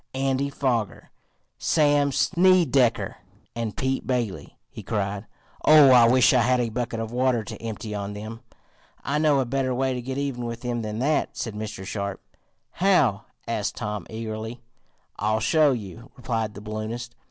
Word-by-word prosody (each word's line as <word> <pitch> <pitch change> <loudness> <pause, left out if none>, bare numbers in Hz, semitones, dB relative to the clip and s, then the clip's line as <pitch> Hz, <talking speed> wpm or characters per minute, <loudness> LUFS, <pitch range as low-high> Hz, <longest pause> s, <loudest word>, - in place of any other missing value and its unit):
"Andy 135 +1 0
Foger, 120 -9 -2 0.5
Sam 145 -2 +3
Snedecker 165 -7 +3 0.4
and 115 -3 -4
Pete 130 0 -1
Bailey!" 120 -7 -3
he - - -8
cried. 100 0 -3 0.4
"Oh, 150 -3 +8
I 120 -2 +7
wish 125 +2 +5
I 125 - +4
had 125 +2 +2
a 120 -1 0
bucket 115 0 -3
of 115 0 -4
water 125 -2 +1
to - - -7
empty 110 -1 -5
on 100 0 -4
them." 110 +2 -7 0.6
"I 145 +3 0
know 150 -3 +3
a 130 - +1
better 130 0 -1
way 130 +1 0
to 125 - -4
get 130 +2 -5
even 140 -4 -3
with 115 0 -5
them 120 -1 -2
than 105 -1 -4
that," 145 +6 0
said 115 - -3
Mr. 105 -2 -6
Sharp. 100 -1 -4 0.5
"How?" 150 - +2 0.2
asked 110 -3 -2
Tom 105 -5 -4
eagerly. 110 +1 -6 0.6
"I'll 110 +2 +1
show 150 +5 +4
you," 115 +1 -6
replied 115 -4 -2
the 100 - -8
balloonist. 110 +3 -5
120 Hz, 165 wpm, -25 LUFS, 110-135 Hz, 0.6 s, Oh